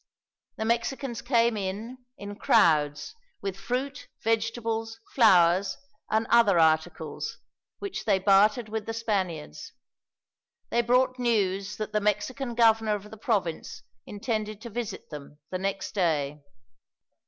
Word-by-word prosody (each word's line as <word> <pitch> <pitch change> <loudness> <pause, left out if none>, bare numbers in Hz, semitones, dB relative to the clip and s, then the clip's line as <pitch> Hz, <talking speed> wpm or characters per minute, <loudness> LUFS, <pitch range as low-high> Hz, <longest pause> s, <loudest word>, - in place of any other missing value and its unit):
The 220 - -2
Mexicans 235 +2 -1
came 235 -2 +2
in, 210 +6 -4 0.2
in 205 0 -7
crowds, 150 - +2 0.3
with 195 -2 -4
fruit, 260 +7 -4 0.2
vegetables, 225 0 -1
flowers, 185 -5 +4 0.3
and 220 +1 +1
other 230 -6 +5
articles, 160 -1 0 0.4
which 400 -2 -5
they 200 -3 +3
bartered 210 +4 +4
with 215 -1 -4
the 225 - -3
Spaniards. 185 - -3 1.0
They 235 - +3
brought 255 +2 +2
news 200 -4 0
that 215 0 -5
the 210 - +1
Mexican 235 +5 -1
governor 225 -2 +4
of 210 +1 -9
the - - -8
province 205 -7 -2 0.2
intended 215 -1 -3
to 235 - -8
visit 235 -5 -5
them, 145 0 -9
the 185 - -2
next 195 0 -3
day. 150 -6 0
215 Hz, 125 wpm, -27 LUFS, 190-230 Hz, 1.0 s, other